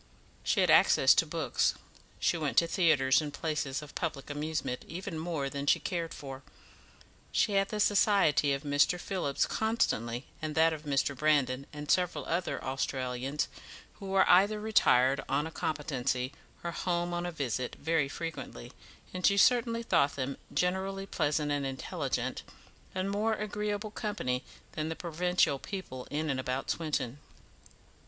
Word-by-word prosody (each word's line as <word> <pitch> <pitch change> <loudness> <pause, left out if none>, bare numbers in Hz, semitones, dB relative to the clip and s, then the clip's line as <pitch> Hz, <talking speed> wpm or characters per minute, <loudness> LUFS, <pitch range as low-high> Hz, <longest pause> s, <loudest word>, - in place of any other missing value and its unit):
She - - +2
had - - +4
access - - +6
to - - +2
books; - - 0 0.4
she - - +2
went 155 -4 -2
to 170 - +7
theatres 155 -6 +3
and 150 -1 -4
places 150 -2 -2
of 150 - -12
public 150 -4 -4
amusement 150 -3 -3
even 175 0 -5
more 160 -4 -2
than 140 +1 -5
she - - +5
cared 170 -3 -3
for; 135 -2 -8 0.9
she - - +2
had 195 0 +2
the 215 - -3
society 195 -8 +4
of 140 +1 -1
Mr. 145 +5 +2
Phillips 175 -8 -1
constantly, 125 - 0 0.2
and 155 -1 -3
that 160 0 +4
of 155 -1 -8
Mr. 140 0 +1
Brandon 140 -2 +1
and 150 -1 -4
several 180 -1 +1
other 170 -5 -2
Australians, 130 +1 -2 0.5
who 195 - -7
were 190 -1 +3
either 200 +4 +5
retired 140 - +3
on 150 - +1
a 160 - -6
competency 135 -5 -2 0.3
or 170 - -2
home 175 0 -1
on 175 0 -2
a - - -3
visit, 130 -5 -3
very 155 -2 0
frequently, 165 - -6 0.4
and 185 0 -5
she 200 - +3
certainly 230 +1 +4
thought 140 -10 +2
them 135 0 -3
generally 190 +2 -1
pleasant 150 -5 0
and 145 -1 0
intelligent, 135 -1 -3 0.5
and 185 +1 -1
more 215 +2 +1
agreeable 210 0 -3
company 170 -13 -2 0.3
than 155 +1 -3
the 160 - -3
provincial 175 -4 +1
people 130 -11 -6
in 155 0 -1
and 130 - -2
about 130 +1 -2
Swinton. 145 -5 -2
155 Hz, 155 wpm, -30 LUFS, 140-185 Hz, 0.9 s, to